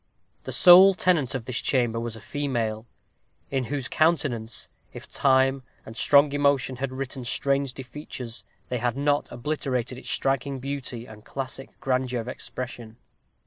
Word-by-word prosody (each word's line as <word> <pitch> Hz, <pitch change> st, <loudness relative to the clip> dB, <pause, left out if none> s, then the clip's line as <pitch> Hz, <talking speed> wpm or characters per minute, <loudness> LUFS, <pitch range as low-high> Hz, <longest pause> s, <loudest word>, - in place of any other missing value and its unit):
The -, -, -4 dB
sole 185 Hz, +2 st, +8 dB
tenant 165 Hz, -9 st, +2 dB
of 125 Hz, -4 st, -4 dB
this 125 Hz, -2 st, -2 dB
chamber 120 Hz, -4 st, +1 dB
was 115 Hz, -1 st, -4 dB
a 110 Hz, -, -10 dB
female, 120 Hz, -6 st, -2 dB, 0.6 s
in 135 Hz, -2 st, 0 dB
whose 135 Hz, +1 st, -3 dB
countenance, 140 Hz, -8 st, 0 dB, 0.2 s
if -, -, -10 dB
time 135 Hz, 0 st, +2 dB, 0.2 s
and 110 Hz, -, -10 dB
strong 140 Hz, +3 st, +5 dB
emotion 140 Hz, -3 st, +1 dB
had 135 Hz, +1 st, -3 dB
written 130 Hz, 0 st, -5 dB
strange 140 Hz, +2 st, 0 dB
defeatures, 130 Hz, -3 st, -7 dB, 0.3 s
they 125 Hz, -, -1 dB
had 120 Hz, +2 st, -1 dB
not 145 Hz, +1 st, +1 dB
obliterated 125 Hz, -1 st, -2 dB
its -, -, -7 dB
striking 135 Hz, 0 st, 0 dB
beauty 130 Hz, -3 st, -5 dB
and 105 Hz, -2 st, -13 dB
classical 135 Hz, +1 st, -6 dB
grandeur 130 Hz, -1 st, 0 dB
of 115 Hz, -, -6 dB
expression. 120 Hz, -3 st, -7 dB
130 Hz, 145 wpm, -26 LUFS, 120-140 Hz, 0.6 s, sole